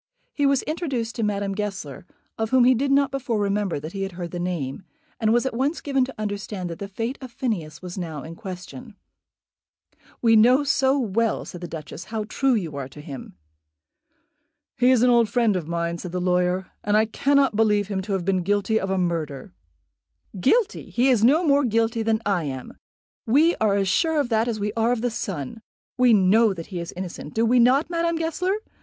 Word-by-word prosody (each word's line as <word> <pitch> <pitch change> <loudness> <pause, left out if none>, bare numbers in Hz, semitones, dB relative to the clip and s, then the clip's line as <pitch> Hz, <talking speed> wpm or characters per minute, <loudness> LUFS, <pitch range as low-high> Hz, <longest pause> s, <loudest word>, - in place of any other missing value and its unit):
He 285 -1 +2
was 275 -2 +2
introduced 275 -8 -3
to 230 - -4
Madame 200 -2 -1
Goesler, 195 -7 -5 0.3
of 220 -1 -2
whom 260 0 +4
he 255 +1 +6
did 275 +3 0
not 280 0 +3
before 250 -4 -2
remember 200 -4 0
that 155 +3 -7
he 195 - -4
had 195 -1 -3
heard 175 -1 -6
the 175 - -5
name, 175 -4 -3 0.4
and 220 -2 +2
was 240 +2 +2
at 265 - -1
once 275 +7 0
given 275 -2 +1
to 265 - -10
understand 205 -3 -4
that 165 - -8
the 200 - -5
fate 225 +6 -4
of 260 -2 -8
Phineas 205 - -4
was 180 +1 -6
now 160 -5 -5
in 160 - -8
question. 195 +5 -9 1.2
"We 225 -1 +4
know 250 +6 +5
so 270 -1 +2
well," 230 -2 0
said 175 - -9
the 175 - -5
Duchess, 160 +1 -8
"how 220 -1 -3
true 260 +4 +1
you 170 -9 -3
are 135 -2 -4
to 135 - -14
him." 140 - -9 1.4
"He 250 +1 +3
is 250 -2 +4
an 250 - +5
old 235 -2 +4
friend 225 -1 +2
of 175 -4 -3
mine," 170 0 -2
said 180 0 -7
the 180 - -1
lawyer, 180 +1 0
"and 210 0 +2
I 220 - +4
cannot 275 +2 +2
believe 210 -2 +2
him 195 -2 -2
to 200 +1 -4
have 185 -3 -1
been 190 -1 +1
guilty 205 +4 +1
of 190 - -3
a 190 - 0
murder." 160 - -3 0.9
"Guilty! 435 - +1
he 250 +3 +2
is 235 -5 +3
no 305 +9 +4
more 285 -1 +4
guilty 230 -1 +1
than 220 0 +1
I 190 -5 0
am. 130 -2 -6 0.5
We 300 +9 +4
are 210 -2 +2
as 195 -1 +1
sure 320 - +2
of 275 -4 0
that 225 0 +1
as 225 -3 -2
we 205 +1 -2
are 230 +1 +1
of 245 -2 0
the 245 - 0
sun. 195 - -5 0.3
We 250 -1 +4
know 210 +1 +4
that 170 +3 -9
he 175 - -3
is 170 - -5
innocent; 180 -4 -7
do 225 +1 +2
we 245 +2 +4
not, 260 +7 +4
Madame 335 0 0
Goesler? 330 +4 -1
215 Hz, 210 wpm, -24 LUFS, 180-250 Hz, 1.4 s, he